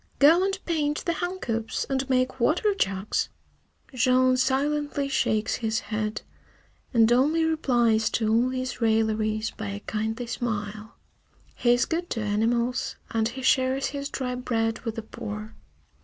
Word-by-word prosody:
Go 325 +6 +6
and 390 0 0
paint 300 -3 -1
the 340 - +1
hen 355 +3 -3
coops 225 -8 -2
and 270 0 -2
make 255 0 +1
water 355 - +2
jugs!" 195 - -1 0.6
Jean 255 +1 +4
silently 280 +2 0
shakes 220 -5 0
his 225 -1 -1
head, 215 0 -2 0.7
and 230 -2 +4
only 300 +7 +3
replies 240 -8 +2
to 220 - 0
all 230 +3 +3
these 255 -1 -4
railleries 220 -1 +1
by 215 - -6
a 200 0 -4
kindly 220 +3 -3
smile. 215 -2 -4 0.6
He 240 -1 +3
is 245 0 +2
good 345 +2 -2
to 225 - -2
animals, 235 +4 0 0.2
and 225 -1 +1
he 260 +3 -7
shares 260 +1 +2
his 280 0 -4
dry 250 -2 -3
bread 225 -3 -1
with 225 -3 -5
the 225 - -5
poor. 215 0 -7
245 Hz, 150 wpm, -26 LUFS, 220-275 Hz, 0.7 s, Go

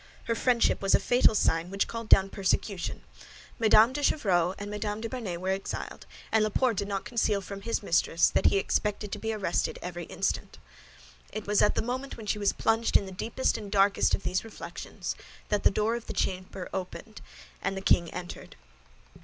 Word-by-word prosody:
Her 230 - 0
friendship 235 +1 +2
was 195 -1 +4
a - - +3
fatal 245 -3 +4
sign 165 -3 +1
which 195 +1 0
called 230 -1 -6
down 195 0 +6
persecution. 195 -1 -1 0.6
Mme. 220 +1 +6
de 290 - -3
Chevreuse 185 - +2
and 205 0 -6
Mme. 210 0 -3
de 230 - -3
Bernet 225 -8 -4
were 185 +1 -3
exiled, 190 +1 -4 0.2
and 220 -1 +4
Laporte 225 +1 +1
did 200 - -1
not 200 +1 -3
conceal 230 -4 +1
from 195 +1 -8
his 230 +1 -2
mistress 170 -2 +3
that - - +3
he 200 - +3
expected 210 +1 -1
to - - -4
be 225 - -2
arrested 220 - -1
every - - -6
instant. - - -3 0.7
It 215 - -5
was 205 0 +2
at - - +3
the - - 0
moment 260 +4 -4
when 225 - -8
she 210 0 -1
was 205 - +2
plunged 225 +1 +2
in - - -3
the 190 - -8
deepest 225 +8 -1
and 205 -2 -8
darkest 200 0 +3
of - - -9
these 185 +1 -1
reflections 225 - -6 0.3
that 210 -1 +1
the - - +5
door 215 +3 0
of 235 -1 -5
the - - -4
chamber 185 0 -3
opened, 190 +3 -6 0.4
and 195 0 -2
the - - -4
king 170 -3 +3
entered. 175 -1 -8
210 Hz, 195 wpm, -28 LUFS, 195-225 Hz, 0.7 s, down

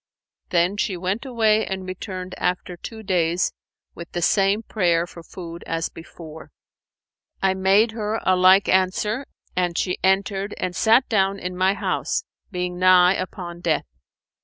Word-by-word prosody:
Then 180 +2 +2
she 195 -3 -1
went 190 +8 -3
away 220 -3 +2
and 190 -2 -4
returned 185 0 -6
after 180 0 -2
two 220 +5 -9
days 175 -2 +1 0.4
with 170 -1 -10
the 175 - -2
same 200 +4 +2
prayer 175 -6 +1
for 175 -1 -12
food 170 0 -9
as 165 0 -2
before. 160 -1 -11 0.9
I 190 -1 +2
made 195 +4 +3
her 220 0 -2
a 185 - +3
like 185 +2 +5
answer, 200 +7 +1 0.3
and 175 -2 0
she 180 - -1
entered 195 +1 +1
and 180 -1 -3
sat 225 +6 +4
down 195 -2 +1
in 180 -1 -5
my 190 +2 +2
house - - -1 0.3
being 180 -2 -4
nigh 185 0 +6
upon 180 -2 -6
death. 160 -3 0
185 Hz, 150 wpm, -23 LUFS, 180-200 Hz, 0.9 s, nigh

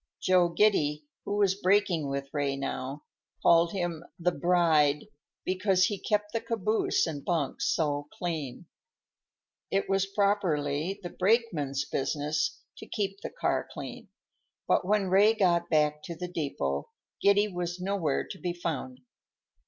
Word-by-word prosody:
Joe 180 -2 +4
Giddy, 155 -7 +2 0.2
who 205 - -2
was 200 -2 +4
braking 185 -6 +2
with 140 0 -4
Ray 145 -2 0
now, 135 +1 -4 0.4
called 170 0 +5
him 175 -4 -3
"the 180 +1 +1
bride," 160 -5 +3 0.4
because 185 0 +2
he 205 -1 -2
kept 210 +1 -1
the 230 - 0
caboose 225 -2 +1
and 150 -4 -5
bunks 160 -6 0
so 145 -2 0
clean. 160 -4 -4 1.0
It 195 - 0
was 195 0 +1
properly 190 -4 0
the 175 - -5
brakeman's 180 - +1
business 145 +2 -1
to - - -10
keep 200 -2 -3
the - - -4
car - - -1
clean, - - -8 0.6
but - - +2
when 205 -1 +2
Ray 205 +4 +5
got 175 -4 +2
back 150 -1 +2
to 170 - -6
the 180 +2 -5
depot, 165 - -3 0.3
Giddy 200 +1 +4
was 175 -2 -4
nowhere 180 -6 -1
to 190 - -8
be 175 -1 -2
found. 140 -7 -4
175 Hz, 140 wpm, -29 LUFS, 150-195 Hz, 1.0 s, called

